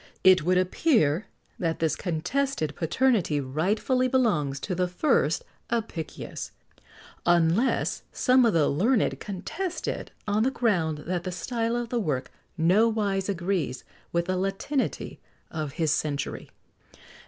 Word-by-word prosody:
It 185 -1 +7
would 180 +4 +2
appear 185 - +2 0.3
that 165 -2 0
this 160 -1 +1
contested 180 - -1
paternity 180 - +2
rightfully 195 - +1
belongs 200 - +1
to 190 - -3
the 180 0 +1
first 180 - +1 0.3
Apicius, 220 -8 -4 0.7
unless 175 +8 +2
some 255 0 +4
of 230 - +3
the 160 -3 +3
learned 215 - +2
contest 210 - -4
it - - -3 0.2
on 210 +1 +2
the 250 - +3
ground 175 - 0
that 175 0 -2
the 185 - -3
style 230 +6 -2
of 240 -1 -2
the 240 - 0
work 145 - -2 0.3
nowise 200 +2 +2
agrees 175 -8 -1 0.3
with 170 0 +1
the 185 +1 -1
latinity 195 +9 -2 0.3
of 155 -3 -4
his 160 -3 +1
century. 145 -2 -2
185 Hz, 130 wpm, -27 LUFS, 160-230 Hz, 0.7 s, It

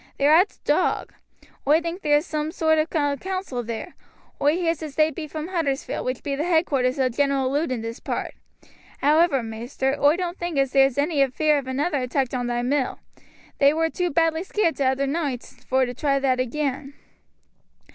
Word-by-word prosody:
They're 285 +2 +4
at 360 +6 +5
t' - - -24
Dog. - - +1 0.5
Oi 305 +3 +5
thinks 340 +3 -5
there's 295 +1 +2
soom 310 -1 -3
sort 315 -1 +2
ov 310 - +1
a 290 -3 0
council 370 -7 -4
there. 230 +9 -6 0.5
Oi 290 +2 +3
heers 335 -3 -1
as 305 -3 -7
they 310 0 +3
be 310 +1 -6
from 310 +2 -6
Huddersfield, 310 -7 -2
which 255 0 -3
be 280 -1 -2
the 295 - -2
headquarters 295 -7 +1
o' 265 -1 +2
General 270 +1 0
Lud 295 +1 0
in 235 -3 -3
this 230 +1 -6
part. - - -4 0.7
However, 300 -2 +4
maister, 240 +4 -2
oi 290 +2 +5
doan't 360 0 -4
think 345 -3 -3
as 270 -1 +2
there's 270 -1 +4
any 290 0 +2
fear 300 +3 +2
of 265 - -9
another 285 +3 -1
attack 255 0 -1
on 245 -1 -1
thy 240 0 -1
mill; 265 +1 0 0.6
they 280 +2 +5
war 325 0 +1
too 360 -1 -1
badly 325 +1 +1
scaared 375 -2 0
t'other 270 0 +1
noight 280 -4 -2 0.3
vor 260 0 +3
to 245 - -5
try 275 +1 0
that 265 -2 +1
again." 275 +2 -2
285 Hz, 190 wpm, -24 LUFS, 265-320 Hz, 0.7 s, at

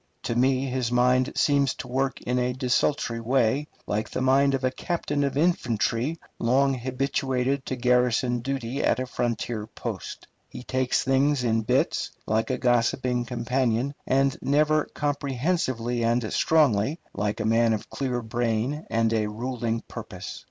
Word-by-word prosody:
To 115 - -2
me 130 +2 +2
his 125 -2 -1
mind 125 +1 +3
seems 140 -2 +2
to - - -7
work 135 +2 -1
in 125 +1 -1
a 125 0 0
desultory 125 -1 0
way, 130 +4 +1 0.2
like 105 +1 -2
the - - -3
mind 135 +1 +4
of 135 - -4
a 130 - +2
captain 145 -1 -2
of 140 -1 -1
infantry 130 -3 +1 0.2
long 135 +4 +3
habituated 130 +1 -1
to 130 - -2
garrison 125 0 +2
duty 135 +1 -3
at - - +3
a 130 - -1
frontier 120 -3 -2
post. - - -6 0.2
He 125 - -9
takes 130 0 0
things 135 +1 +2
in 115 -2 +2
bits, 110 - +1 0.2
like 110 +1 0
a - - 0
gossiping 120 0 +1
companion, 125 +2 0
and 135 +1 +2
never 150 +2 +2
comprehensively 135 -4 -1
and 115 -1 0
strongly, 145 -2 +2
like 105 +2 -2
a 110 - -1
man 115 +1 +3
of 110 -2 -2
clear 125 -3 -2
brain 120 +5 -1
and 115 0 +1
a 110 -1 +1
ruling 115 +1 -3
purpose. - - -8
125 Hz, 150 wpm, -26 LUFS, 115-135 Hz, 0.2 s, mind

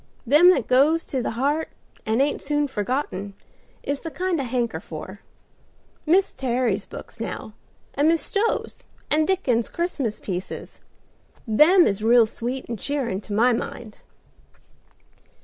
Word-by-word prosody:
Them 300 +8 +7
that 275 -10 +3
goes 295 +6 +3
to 265 - -3
the - - -2
heart 290 +5 0 0.4
and 225 +5 +3
ain't 290 - -1
soon 295 -1 0
forgotten 205 -5 -3 0.5
is 280 0 -3
the 325 - -5
kind 360 -2 -1
I - - -3
hanker 240 -1 -1
for. - - -9 0.9
Mis 375 +5 +3
Terry's 240 -6 -1
books - - -10
now, 220 -1 -5 0.4
and 285 +2 +2
Mis 330 0 +4
Stowe's, 425 +3 -2 0.2
and 310 +1 +3
Dickens's 250 -12 +1
Christmas 285 -10 -2
pieces, 185 -1 -6 0.6
them 305 - +6
is 200 +1 0
real 230 +1 +5
sweet 245 +4 -5
and 230 -3 -5
cheerin', 255 -9 -2
to 210 - -7
my 240 +4 +4
mind." 230 -1 -6
260 Hz, 140 wpm, -24 LUFS, 225-305 Hz, 0.9 s, Them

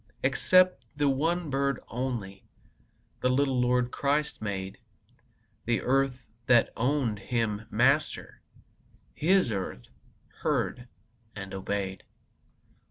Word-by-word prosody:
Except 185 +7 +4
the 145 0 +1
one 160 +4 0
bird 140 -1 0
only 115 -6 -4 0.8
The 125 - +1
little 130 -1 +2
Lord 125 0 +2
Christ 145 +2 0
made; 95 -2 -4 0.9
The 120 0 +1
earth 130 -1 +1 0.2
that 120 -2 +4
owned 125 -3 0
Him 110 0 -2
Master, 135 +7 +1 0.7
His 180 -5 +3
earth 95 - -4 0.6
heard 125 0 -1 0.5
and 100 -2 -7
obeyed. 95 0 -3
125 Hz, 100 wpm, -28 LUFS, 105-140 Hz, 0.9 s, Except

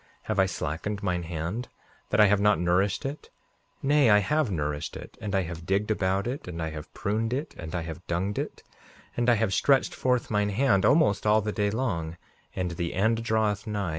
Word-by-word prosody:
Have 110 -2 -2
I 95 - +5
slackened 95 +5 -4
mine 90 -2 0
hand, 85 +8 -4 0.4
that - - +1
I 105 - +9
have 100 0 +3
not 105 0 +4
nourished 90 +5 +1
it, 140 +3 -5 0.5
Nay, 145 -2 +4
I 105 - +7
have 150 +6 +1
nourished 75 -5 -3
it, - - -11
and 105 -2 -2
I 95 - +2
have 85 -1 -7
digged 100 +3 +1
about 95 -1 0
it, 125 0 -4
and 85 -2 -6
I 80 -1 -2
have 75 -1 -8
pruned 110 +3 -1
it, 140 +5 -3
and 80 +1 -7
I 85 - -2
have 80 +1 -8
dunged 95 +4 -1
it; - - -5 0.5
and 120 0 +1
I 120 - +6
have 110 -3 0
stretched 135 +7 +3
forth 125 -2 0
mine 105 -1 +2
hand 105 -2 +2
almost 110 -10 +3
all 105 +1 +5
the 105 +1 -2
day 105 -1 0
long, 90 -8 -2 0.4
and 90 -1 -2
the 85 0 -3
end 110 +4 +1
draweth 110 -1 0
nigh. 100 -4 -2
100 Hz, 210 wpm, -27 LUFS, 90-110 Hz, 0.5 s, I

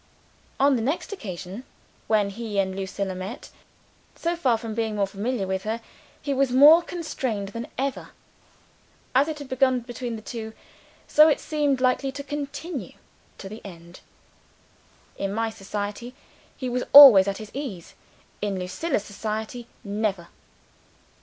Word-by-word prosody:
On 275 0 +4
the 235 - -1
next 305 - -2
occasion 195 - -7 0.4
when 210 -2 +2
he 215 0 -5
and 190 -1 +1
Lucilla 195 0 -3
met 185 +6 -7 0.6
so 340 +1 -1
far 260 -9 +2
from 225 -1 -6
being 220 -1 -2
more 200 -1 +1
familiar 200 +3 -3
with 190 0 -2
her, 220 +3 -3 0.4
he 285 - -2
was 270 -1 +1
more 295 +6 +8
constrained 260 - -4
than 230 +3 -6
ever. 270 +1 -3 1.0
As 270 +3 +4
it 315 -1 -4
had 285 -2 -8
begun 260 -1 +2
between 240 0 -5
these 220 - -10
two, 220 -2 -6 0.5
so 305 +1 +7
it 300 - +2
seemed 290 -4 0
likely 255 +1 +1
to 280 +1 -6
continue 290 - -5 0.4
to 195 - -8
the 215 +3 -9
end. 170 -2 -12 1.2
In 195 0 -2
my 225 +2 -1
society, 205 +4 -5 0.4
he 255 - -4
was 250 0 -1
always 255 -10 +11
at 195 0 -1
his 215 -1 -9
ease. 245 - -6 0.5
In 205 -2 -1
Lucilla's 200 - -2
society, 220 +3 -5 0.2
never! 200 -4 -2
230 Hz, 145 wpm, -25 LUFS, 200-270 Hz, 1.2 s, always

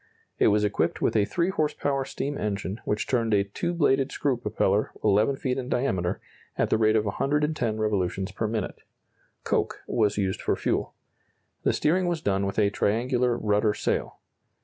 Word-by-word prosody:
It - - +5
was 105 +1 +3
equipped 105 -1 0
with - - +1
a 105 -2 +4
3 170 - 0
horse 155 -6 0
power 135 -2 -1
steam 145 +2 -4
engine 105 -2 -3
which 105 +1 -1
turned 115 -4 +1
a 100 - +3
two 100 - -3
bladed 140 -5 +2
screw 140 -3 0
propeller 105 -2 0
11 110 +6 +3
feet 130 -1 -2
in 125 -1 -5
diameter, 95 -9 0 0.4
at - - +1
the 110 - +3
rate 110 0 +4
of 110 -1 +2
110 140 0 0
revolutions 100 -2 -1
per 110 +3 -2
minute. 110 -2 -3 0.6
Coke - - -1
was 105 -3 +1
used 95 -2 -1
for - - +1
fuel. - - -1 0.7
The - - +2
steering 180 +4 +1
was 170 -2 0
done 100 -7 0
with 100 - -4
a 100 -2 +3
triangular 120 +4 +1
rudder 105 -1 +1
sail. - - -2
110 Hz, 175 wpm, -26 LUFS, 105-135 Hz, 0.7 s, It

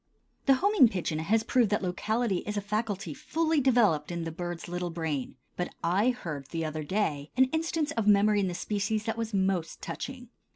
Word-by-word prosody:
The 270 - +7
homing 380 - +5
pigeon 170 -6 -2
has 215 +7 +2
proved 240 -3 +3
that 210 -1 0
locality 210 +3 0
is 210 0 -2
a - - 0
faculty 205 -4 -2
fully 320 - 0
developed 215 - +3
in 170 -1 -3
the 165 - -4
bird's 175 0 -5
little 175 0 -3
brain, 160 -6 -3 0.2
but 180 - -4
I 190 +8 +3
heard, 160 - -4
the 165 +2 -3
other 155 0 -3
day, 150 -5 -1
an 260 - +7
instance 320 -1 0
of 225 -3 -1
memory 205 0 +5
in 195 - +1
the 175 - -3
species 210 +3 -1
that 225 +1 -2
was 225 -1 -3
most 190 -4 0
touching. 255 -3 -6
200 Hz, 195 wpm, -29 LUFS, 170-230 Hz, 0.2 s, The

